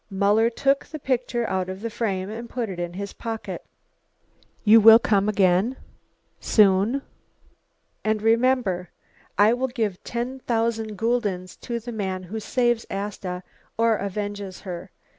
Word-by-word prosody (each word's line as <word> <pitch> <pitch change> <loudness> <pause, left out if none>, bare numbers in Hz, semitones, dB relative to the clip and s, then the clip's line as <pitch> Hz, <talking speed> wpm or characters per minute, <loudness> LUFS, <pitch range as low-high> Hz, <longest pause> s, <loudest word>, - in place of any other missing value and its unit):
Muller 205 +3 +3
took 275 +4 +1
the 310 - -7
picture 250 -4 -1
out 185 -1 -1
of 190 +1 -6
the 230 0 -4
frame 195 -5 -2
and 235 +2 -7
put 240 -4 -3
it 180 -2 -6
in 175 0 -3
his 200 +2 -6
pocket. 225 -1 -5 1.0
"You 220 +1 +7
will 225 +1 +10
come 210 -3 +2
again? 195 +4 +2 0.6
soon? 210 +6 +3 1.0
And 215 0 +1
remember, 225 -6 +2 0.5
I 210 +3 +6
will 255 +2 0
give 220 -7 -3
ten 245 +3 -4
thousand 225 -3 -1
guldens 205 -5 -1
to 235 -1 -4
the 240 +2 -7
man 190 -4 -3
who 205 +5 -5
saves 240 +1 +1
Asta, 195 -2 -4 0.3
or 230 -1 +3
avenges 200 -1 -4
her. 175 -3 -7
215 Hz, 140 wpm, -24 LUFS, 195-235 Hz, 1.0 s, will